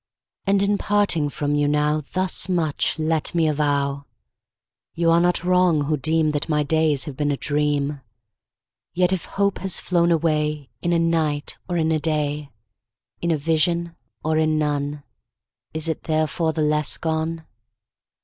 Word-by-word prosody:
And, 195 Hz, 0 st, +3 dB
in 200 Hz, 0 st, +1 dB
parting 200 Hz, -8 st, +1 dB
from 145 Hz, +1 st, -2 dB
you 145 Hz, 0 st, +2 dB
now, 150 Hz, +1 st, +1 dB
Thus 185 Hz, +1 st, -1 dB
much 165 Hz, -6 st, 0 dB
let 160 Hz, +1 st, 0 dB
me 165 Hz, -2 st, +3 dB
avow 140 Hz, -2 st, 0 dB, 0.9 s
You 165 Hz, 0 st, +2 dB
are 165 Hz, -, +5 dB
not 175 Hz, 0 st, +1 dB
wrong, 180 Hz, -3 st, +3 dB
who 150 Hz, +2 st, 0 dB
deem 155 Hz, +1 st, +1 dB
That 150 Hz, +2 st, -3 dB
my 150 Hz, -1 st, +2 dB
days 155 Hz, -2 st, +1 dB
have 145 Hz, -4 st, -7 dB
been 145 Hz, +1 st, -1 dB
a 140 Hz, -, 0 dB
dream: 145 Hz, -1 st, -1 dB, 0.9 s
Yet 180 Hz, +1 st, +2 dB
if 185 Hz, -, -2 dB
hope 200 Hz, 0 st, -1 dB
has 190 Hz, -1 st, -1 dB
flown 170 Hz, -1 st, +1 dB
away 150 Hz, -3 st, 0 dB
In 175 Hz, -, 0 dB
a 170 Hz, -, +3 dB
night, 160 Hz, -3 st, 0 dB
or 175 Hz, -, 0 dB
in 160 Hz, -1 st, +1 dB
a 155 Hz, -, +2 dB
day, 150 Hz, -2 st, -1 dB, 0.7 s
In 170 Hz, -, -1 dB
a 160 Hz, -, +2 dB
vision 165 Hz, +2 st, 0 dB, 0.3 s
or 155 Hz, 0 st, +1 dB
in 155 Hz, 0 st, +2 dB
none, 145 Hz, -1 st, -1 dB, 0.7 s
Is 160 Hz, +1 st, -3 dB
it 160 Hz, -, -3 dB
therefore 155 Hz, +1 st, 0 dB
the 155 Hz, -1 st, -1 dB
less 150 Hz, 0 st, +1 dB
gone? 160 Hz, 0 st, -2 dB
155 Hz, 160 wpm, -22 LUFS, 150-170 Hz, 0.9 s, are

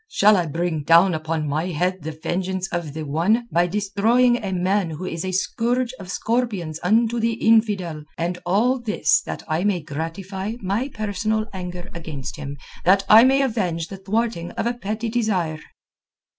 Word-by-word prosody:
Shall 210 Hz, -, +5 dB
I 175 Hz, -3 st, +1 dB
bring 165 Hz, +1 st, -1 dB
down 170 Hz, +5 st, +5 dB
upon 160 Hz, -1 st, -2 dB
my 155 Hz, +4 st, -1 dB
head 180 Hz, +2 st, -1 dB
the 155 Hz, +2 st, -4 dB
vengeance 185 Hz, +4 st, -3 dB
of 170 Hz, -4 st, -3 dB
the 160 Hz, -, -4 dB
One 175 Hz, +11 st, +1 dB
by 175 Hz, +1 st, +3 dB
destroying 210 Hz, +6 st, +2 dB
a 195 Hz, -, -2 dB
man 185 Hz, 0 st, +1 dB
who 160 Hz, +3 st, -6 dB
is 165 Hz, -2 st, -4 dB
a 185 Hz, -, -2 dB
scourge 235 Hz, +6 st, 0 dB
of 185 Hz, -2 st, -9 dB
scorpions 205 Hz, -9 st, -1 dB
unto 225 Hz, +5 st, +2 dB
the 230 Hz, 0 st, +1 dB
infidel—and 180 Hz, -7 st, 0 dB
all 230 Hz, +9 st, +2 dB
this 230 Hz, -3 st, +2 dB
that -, -, -5 dB
I 160 Hz, +2 st, 0 dB
may 200 Hz, -3 st, +1 dB
gratify 180 Hz, +6 st, -5 dB
my 205 Hz, +6 st, -1 dB
personal 215 Hz, 0 st, -1 dB
anger 180 Hz, -1 st, -6 dB
against 155 Hz, -5 st, -6 dB
him, 145 Hz, -1 st, -6 dB, 0.3 s
that 195 Hz, +2 st, +4 dB
I 220 Hz, +2 st, +9 dB
may 270 Hz, +2 st, +4 dB
avenge 180 Hz, -10 st, -1 dB
the 195 Hz, -, -7 dB
thwarting 195 Hz, -2 st, -1 dB
of -, -, -2 dB
a 240 Hz, -, +1 dB
petty 220 Hz, 0 st, -4 dB
desire?" 200 Hz, -9 st, 0 dB
190 Hz, 170 wpm, -22 LUFS, 165-220 Hz, 0.3 s, I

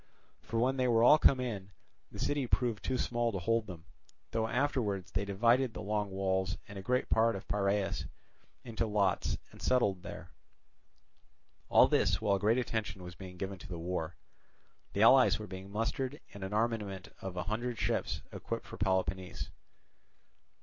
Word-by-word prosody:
For 115 Hz, -, -4 dB
when 130 Hz, +3 st, +2 dB
they 130 Hz, -1 st, +2 dB
were 115 Hz, -1 st, +4 dB
all 150 Hz, +5 st, +8 dB
come 135 Hz, -, +5 dB
in, 105 Hz, -6 st, -4 dB, 0.4 s
the -, -, -9 dB
city 145 Hz, -3 st, 0 dB
proved 120 Hz, -3 st, 0 dB
too 130 Hz, -, 0 dB
small 120 Hz, -1 st, 0 dB
to 100 Hz, -, -3 dB
hold 115 Hz, +4 st, 0 dB
them; 85 Hz, -3 st, -9 dB, 0.5 s
though 110 Hz, 0 st, 0 dB
afterwards 110 Hz, -7 st, 0 dB
they 100 Hz, +1 st, -1 dB
divided 115 Hz, +5 st, +2 dB
the -, -, -5 dB
Long 105 Hz, -1 st, -1 dB
Walls 95 Hz, -1 st, 0 dB
and 100 Hz, -1 st, -8 dB
a -, -, -5 dB
great 125 Hz, +6 st, 0 dB
part 115 Hz, 0 st, +3 dB
of 95 Hz, -, -7 dB
Piraeus 100 Hz, -1 st, 0 dB, 0.6 s
into 115 Hz, -1 st, -2 dB
lots 100 Hz, -3 st, +1 dB
and -, -, -14 dB
settled 105 Hz, -8 st, +2 dB
there. -, -, -9 dB, 1.4 s
All -, -, +7 dB
this 90 Hz, -, +2 dB
while 100 Hz, -3 st, +2 dB
great 110 Hz, +4 st, +3 dB
attention 110 Hz, -6 st, -2 dB
was 90 Hz, 0 st, -8 dB
being 90 Hz, 0 st, -10 dB
given 95 Hz, 0 st, -4 dB
to -, -, -10 dB
the 90 Hz, -, -5 dB
war; 85 Hz, -1 st, -3 dB, 0.8 s
the -, -, +3 dB
allies -, -, +7 dB
were -, -, -6 dB
being 95 Hz, +1 st, -8 dB
mustered, 130 Hz, +6 st, -2 dB
and 100 Hz, -1 st, -8 dB
an 95 Hz, -, -4 dB
armament 105 Hz, -3 st, -1 dB
of 95 Hz, -1 st, -6 dB
a 90 Hz, -, -1 dB
hundred 120 Hz, +3 st, -2 dB
ships -, -, -1 dB
equipped -, -, -5 dB
for -, -, -9 dB
Peloponnese. 95 Hz, -1 st, -1 dB
105 Hz, 170 wpm, -32 LUFS, 95-120 Hz, 1.4 s, all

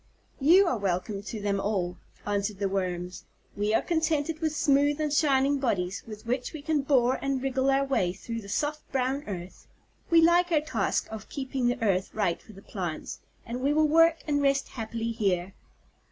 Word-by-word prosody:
"You 345 Hz, +8 st, +6 dB
are 255 Hz, -10 st, 0 dB
welcome 195 Hz, +1 st, -2 dB
to 215 Hz, +2 st, -6 dB
them 200 Hz, -1 st, -1 dB
all," 190 Hz, -4 st, -1 dB, 0.3 s
answered 205 Hz, 0 st, -1 dB
the 200 Hz, 0 st, 0 dB
Worms. 180 Hz, -2 st, -3 dB, 0.3 s
"We 205 Hz, +1 st, 0 dB
are -, -, +2 dB
contented 320 Hz, -2 st, 0 dB
with 315 Hz, -1 st, 0 dB
smooth 285 Hz, +1 st, +3 dB
and 300 Hz, -2 st, -1 dB
shining 280 Hz, -2 st, +3 dB
bodies, 195 Hz, -8 st, -1 dB
with 215 Hz, 0 st, -9 dB
which 250 Hz, +2 st, -2 dB
we 305 Hz, -2 st, -7 dB
can 305 Hz, -1 st, +1 dB
bore 260 Hz, -2 st, +2 dB
and 275 Hz, -1 st, 0 dB
wriggle 265 Hz, 0 st, 0 dB
our 275 Hz, 0 st, +3 dB
way 225 Hz, -10 st, +1 dB
through 230 Hz, +5 st, -6 dB
the 200 Hz, -, -11 dB
soft, 300 Hz, +6 st, -2 dB
brown 265 Hz, +2 st, 0 dB
earth. 180 Hz, -3 st, -7 dB, 0.4 s
We 335 Hz, -, +6 dB
like 345 Hz, +2 st, +4 dB
our 315 Hz, -, +4 dB
task 310 Hz, 0 st, -1 dB
of 220 Hz, -1 st, -8 dB
keeping 265 Hz, -2 st, -2 dB
the 245 Hz, -, 0 dB
earth 190 Hz, -3 st, +1 dB
right 200 Hz, -6 st, 0 dB
for 220 Hz, -, -15 dB
the 195 Hz, 0 st, -14 dB
plants, 175 Hz, -6 st, -5 dB, 0.3 s
and 240 Hz, +2 st, -5 dB
we 280 Hz, +3 st, +2 dB
will 310 Hz, 0 st, +4 dB
work 330 Hz, +2 st, +4 dB
and 290 Hz, -2 st, +1 dB
rest 275 Hz, -1 st, +1 dB
happily 230 Hz, 0 st, -4 dB
here." 195 Hz, -5 st, -1 dB
255 Hz, 190 wpm, -28 LUFS, 200-290 Hz, 0.4 s, You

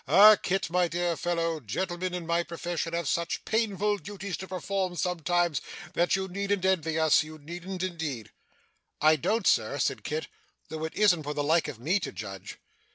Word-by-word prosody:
Ah 210 Hz, +2 st, +9 dB
Kit, 190 Hz, -4 st, -2 dB
my 180 Hz, 0 st, +3 dB
dear 175 Hz, 0 st, -1 dB
fellow, 165 Hz, 0 st, -1 dB
gentleman 175 Hz, -, -3 dB
in 175 Hz, -2 st, -5 dB
my 170 Hz, +1 st, +2 dB
profession 170 Hz, -1 st, -4 dB
have 170 Hz, -3 st, -1 dB
such 170 Hz, +1 st, -1 dB
painful 210 Hz, -2 st, +1 dB
duties 200 Hz, +2 st, -5 dB
to 190 Hz, -, -7 dB
perform 185 Hz, 0 st, -2 dB
sometimes, 175 Hz, -3 st, 0 dB, 0.3 s
that 175 Hz, +2 st, +2 dB
you 190 Hz, 0 st, -2 dB
needn't 200 Hz, 0 st, -1 dB
envy 165 Hz, -4 st, +1 dB
us 160 Hz, -2 st, +5 dB
you 155 Hz, 0 st, -8 dB
needn't 175 Hz, +5 st, -6 dB
indeed!' 160 Hz, -, -4 dB, 0.7 s
'I 155 Hz, +1 st, +5 dB
don't, 220 Hz, -, 0 dB
sir,' -, -, +3 dB
said -, -, -1 dB
Kit, 460 Hz, +1 st, -2 dB, 0.4 s
'though 160 Hz, 0 st, -4 dB
it 160 Hz, -, -6 dB
isn't 200 Hz, -6 st, +4 dB
for 150 Hz, 0 st, -4 dB
the 145 Hz, -, 0 dB
like 160 Hz, +3 st, +3 dB
of 145 Hz, -6 st, -6 dB
me 170 Hz, +11 st, +1 dB
to -, -, -4 dB
judge. 95 Hz, 0 st, -8 dB
175 Hz, 180 wpm, -28 LUFS, 160-190 Hz, 0.7 s, Ah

